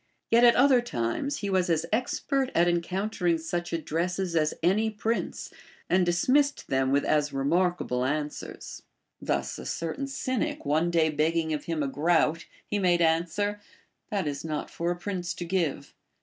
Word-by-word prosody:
A^et 235 - +7
at 240 -1 +7
other 255 -1 +5
times 240 - -2
he 200 - -2
was 185 -2 +2
as 165 -1 +1
expert 260 +3 0
at 170 +1 +4
encountering 175 +1 0
such 175 +2 -4
addresses 170 +2 -2
as 155 -1 +1
any 210 +6 +3
prince, 220 +2 -3 0.4
and 180 -1 +3
dismissed 275 +12 +2
them 130 0 +1
with 140 +1 +2
as 150 -1 +1
remarkable 145 -2 0
answers. 150 +2 -4 0.4
Thus - - -2
a - - -8
certain 170 +12 -3
Cynic 260 - -2
one 155 +4 +2
day 165 -2 +2
beg 155 +2 +1
ging 160 -1 0
of 150 - -4
him 165 -3 -1
a - - -1
groat, 160 +3 +1 0.2
he 205 - -2
made 180 -3 +3
answer, 170 +6 +1 0.5
That 195 -6 -1
is 145 -1 -4
not 155 -2 -4
for 170 +1 -2
a 175 - 0
prince 180 -1 -4
to 175 - -5
give. 170 -5 -2
175 Hz, 165 wpm, -27 LUFS, 155-205 Hz, 0.5 s, A^et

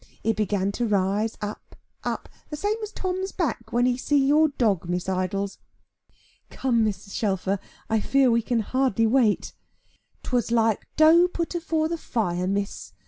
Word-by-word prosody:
It 225 0 +1
began 200 -2 0
to 240 +3 -1
rise 205 +2 0
up, 210 0 -7 0.3
up, - - -3 0.2
the 300 - -4
same 415 +7 0
as 425 -1 -5
Tom's 375 -1 -3
back, 235 -9 -3
when 240 +1 +2
he 250 -1 +2
see 290 +3 +1
your 290 +3 +4
dog, 210 - 0
Miss 180 +1 -2
Idols." 190 +1 -2 0.9
"Come, 240 -4 +1
Mrs. 205 -2 -3
Shelfer, 195 -2 -1 0.3
I 220 0 +1
fear 270 +3 +3
we 230 0 +3
can 230 0 0
hardly 255 -1 +1
wait." 225 -2 +2 0.7
"'Twas 245 -2 0
like 225 -2 +1
dough 325 +3 +6
put 340 -1 -3
afore 325 -2 0
the 335 0 -3
fire, 180 - -1
Miss. 200 - -3
230 Hz, 160 wpm, -25 LUFS, 200-285 Hz, 0.9 s, dough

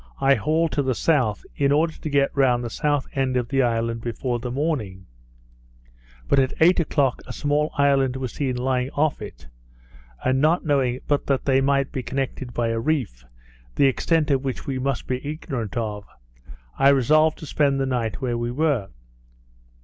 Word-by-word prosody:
I 135 0 +4
hauled 160 +3 +1
to 145 - 0
the 130 -2 -1
south, 125 -8 +1
in 140 -1 +1
order 160 +3 +2
to 155 - -6
get 140 -1 +1
round 125 -3 +2
the 120 - -5
south 145 -1 0
end 130 -2 0
of 120 -1 -2
the 135 -1 +2
island 115 -1 0
before 120 +1 -3
the 125 +1 -5
morning; 120 - -3 1.2
but - - +3
at 130 -1 +1
eight 175 +3 +5
o'clock 145 -5 0
a - - -6
small 150 +1 0
island 135 -2 +3
was 130 -2 -4
seen 135 -3 -2
lying 125 0 0
off 150 -4 0
it, 105 -11 -9 0.8
and 130 +1 +2
not 165 +4 +2
knowing 135 -4 +1
but 145 -1 0 0.2
they 135 -1 +3
might 140 0 +1
be 135 - -3
connected 130 0 -4
by 120 -1 -1
a 115 0 -1
reef, 120 - -2 0.5
the - - +4
extent 150 +3 +1
of 135 -1 +1
which 130 -2 -4
we 135 -2 -3
must 135 -2 -2
be 130 0 -3
ignorant 135 - -5
of, 105 -3 -3 0.8
I 135 - +6
resolved 155 +4 +3
to - - -9
spend 140 -2 +1
the 135 - +1
night 120 -4 -2
where 120 -2 -1
we 120 0 -2
were. 135 -5 0
135 Hz, 180 wpm, -23 LUFS, 120-145 Hz, 1.2 s, I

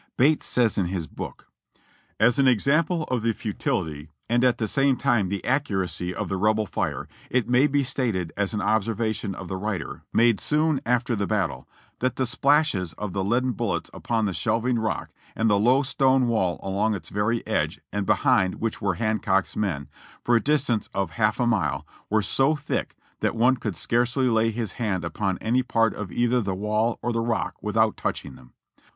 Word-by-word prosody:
Bates 150 +4 +3
says 120 -4 +2
in 90 - +1
his 90 -2 -3
book - - -8 0.3
(p. - - -34 0.4
161): - - +8
"As 120 +2 +1
an 135 - +5
example 150 - +2
of 120 - -2
the 115 0 +1
futility, 80 -8 -3 0.2
and 120 +2 +2
at 125 -2 +3
the 110 - -1
same 135 +2 +2
time 120 -8 +1
the 100 0 -2
accu 130 -6 +1
racy 90 -1 -2
of - - -4
the 95 - -2
Rebel 110 +2 +2
fire, - - -3 0.2
it 125 -3 +1
may 125 +4 +4
be 145 -1 +1
stated 110 -10 -2
as 100 +1 -1
an 105 - -1
observation 110 -1 0
of 90 - -8
the 95 - -4
writer 100 -4 -4
made 115 -2 +4
soon 150 -1 +1
after 125 0 +1
the 100 -2 -1
battle, - - -2 0.3
that 130 +1 0
the 130 - 0
splashes 125 - +2
of 105 +2 -5
the 95 - -1
leaden 125 +6 +1
bullets 100 -9 -2
upon 115 -2 -1
the 100 - -1
shelving 115 +6 0
rock 110 0 -2 0.2
and 110 -1 +2
the 100 - +3
low 125 +6 +4
stone 130 -1 +2
wall 95 -7 0
along 105 +3 0
its 85 -5 -8
very 105 +3 -1
edge - - -1
and 105 -2 -2
behind 95 -1 +3
which 115 -1 -3
were 100 -3 0
Hancock's 100 -2 0
men, 80 -10 -2 0.4
for 120 - +3
a 115 - +4
distance 140 -7 0
of 95 -4 -1
half 105 +2 +1
a 120 - +2
mile, 85 - 0 0.2
were 110 0 +2
so 135 +8 +2
thick, 150 -1 -3 0.2
that - - 0
one 125 +3 +4
could 105 -6 -4
scarcely 120 +2 +1
lay 115 0 +3
his 115 -1 -3
hand 100 -7 -2
upon 95 +3 -2
any 120 +3 +2
part 115 -3 +1
of 100 -4 -6
either 120 +1 +2
the 95 -3 -2
wall 105 +4 0
or 120 - 0
the 115 - 0
rock 115 -1 -1
without 110 +1 +1
touching - - -3
them. 60 - -17
110 Hz, 200 wpm, -25 LUFS, 100-125 Hz, 0.4 s, 161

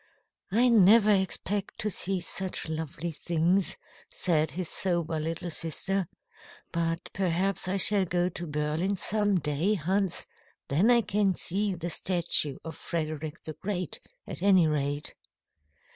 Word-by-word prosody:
"I 240 +5 +4
never 215 0 +6
expect 200 +1 -1
to 215 - -1
see 190 0 0
such 185 +1 +2
lovely 160 +1 -4
things," 170 +3 0 0.3
said 160 -3 0
his 180 +1 -3
sober 170 -3 0
little 165 +2 -3
sister. 180 +4 0 0.6
"But 165 0 -2
perhaps 190 +1 0
I 190 +2 0
shall 195 0 +5
go 175 0 0
to 175 -1 -6
Berlin 150 +6 -1
some 205 0 0
day, 160 +8 0
Hans. 190 +2 -1 0.4
Then 170 - +3
I 240 -1 +5
can 200 -3 0
see 195 +3 -1
the 170 0 -5
statue 170 -5 +2
of 160 -2 -6
Frederick 155 -1 -4
the 155 - -6
Great, 185 -1 -4 0.3
at - - -7
any 190 -3 +5
rate." 145 -1 -1
175 Hz, 135 wpm, -28 LUFS, 160-195 Hz, 0.6 s, never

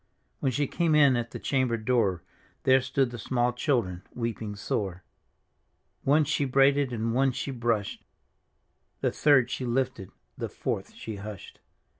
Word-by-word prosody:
When 135 - +1
she 145 +4 0
came 165 +2 +1
in 140 -4 +6
at 120 -1 -2
the - - -7
chamber 130 -4 0
door. 110 -6 +1 0.4
There 130 0 +5
stood 130 0 0
the 120 - -7
small 120 +1 0
children 115 - 0
weeping 115 -3 -3
sore. 95 -3 -3 1.0
One 150 +3 +4
she 150 0 0
braided 135 0 +3
and 115 -1 -1
one 135 +2 +3
she 135 +2 -3
brushed. 115 -5 -1 1.0
The - - +1
third 130 -4 +4
she - - -3
lifted, 125 -5 -1 0.3
the - - -3
fourth - - -4
she 110 -2 -7
hushed. 100 -1 -9
125 Hz, 150 wpm, -28 LUFS, 110-135 Hz, 1.0 s, in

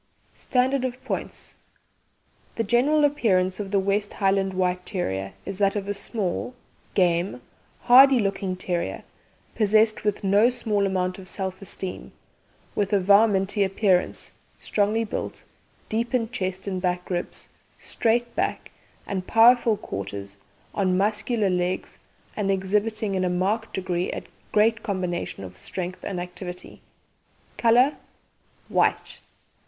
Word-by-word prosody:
'" - - -36
STANDARD 260 +1 0
OF 250 -1 -4
POINTS: - - -5 1.0
The 230 - 0
GENERAL 260 +8 +3
APPEARANCE 190 -10 +1
of 200 -2 -4
the 200 - +1
West 200 +1 0
Highland 195 -1 +1
White 180 -1 0
Terrier 95 - -3
is 195 0 -6
that 200 0 +2
of 200 -1 -3
a 205 - -1
small, 205 +3 -3 0.4
game, 175 -5 +2 0.4
hardy 265 +2 +8
looking 195 -3 -1
terrier, 180 -1 -3 0.5
possessed 215 0 +3
with 210 -1 -1
no 200 +4 +5
small 215 -5 0
amount 185 -1 -1
of 185 - -10
self 190 0 -3
esteem, 190 -1 -5 0.6
with 200 -2 -1
a 200 - +5
"varminty" 200 +1 +4
appearance, 190 -1 +1 0.3
strongly 215 +2 0
built, 220 - -5 0.4
deep 235 +3 -1
in 230 -3 0
chest 190 -5 -3
and 185 -2 -2
back 180 -1 -1
ribs, 175 -1 -3 0.3
straight 235 +1 0
back - - -2 0.3
and 190 -2 -4
powerful 230 -1 +5
quarters, 100 - -6 0.4
on 185 -2 +1
muscular 210 +1 +1
legs 180 0 -2 0.4
and 205 -2 -1
exhibiting 205 +2 0
in 185 -1 0
a 180 - +1
marked 200 +5 -1
degree 180 -1 -1
a - - -5 0.3
great 225 +2 +3
combination 180 - -3
of 90 -1 -10
strength 185 0 -5
and 185 -3 -3
activity. 180 0 -8 0.8
COLOUR 245 +5 +4 0.7
White. - - 0
195 Hz, 130 wpm, -25 LUFS, 185-220 Hz, 1.0 s, hardy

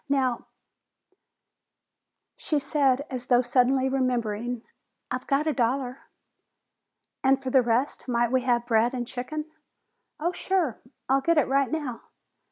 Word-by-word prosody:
Now 260 -3 0 0.9
" - - -59 0.3
She 305 - -1
said, 280 -1 +2
as 250 -1 -5
though 245 0 +4
suddenly 260 +2 +2
remembering, 245 -3 -1 0.5
"I've 255 0 -4
got 280 +2 +1
a 310 - +1
dollar." 255 +1 -1 1.2
"And 265 0 +4
for 265 -1 -4
the 265 - +6
rest 240 +5 0
might 240 -1 +1
we 260 0 +3
have 240 -1 +1
bread 235 +2 +2
and 245 -1 -2
chicken?" 300 +6 -5 0.7
"Oh, 340 +3 0
sure! 360 - -1 0.3
I'll 270 +1 +3
get 335 +4 +2
it 300 - +4
right 275 0 +2
now!" 290 -7 -3
260 Hz, 140 wpm, -26 LUFS, 245-275 Hz, 1.2 s, the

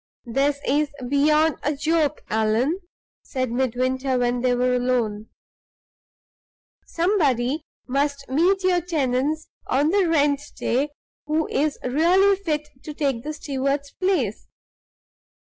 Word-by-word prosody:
"This 275 +4 0
is 295 +2 +2 0.2
beyond 300 +3 +3
a 295 +1 -1
joke, 305 0 0
Allan," 220 - +1 0.4
said 255 -3 -3
Midwinter, 255 +1 0
when 245 0 0
they 250 0 +2
were 250 +1 +1
alone. 240 -4 0 1.6
"Somebody 305 - +1 0.3
must 280 +1 -1
meet 355 +8 +2
your 360 -1 +3
tenants 300 -2 -1 0.2
on 285 +4 +2
the 385 0 +3
rent 290 -3 +2 0.2
day 270 +5 0 0.4
who 310 +1 0
is 300 0 0
really 350 +9 +4
fit 310 -6 -2
to 300 - -8
take 275 -6 0
the 305 +4 -5
steward's 280 -1 -2
place. 335 - -1
285 Hz, 115 wpm, -23 LUFS, 255-315 Hz, 1.6 s, really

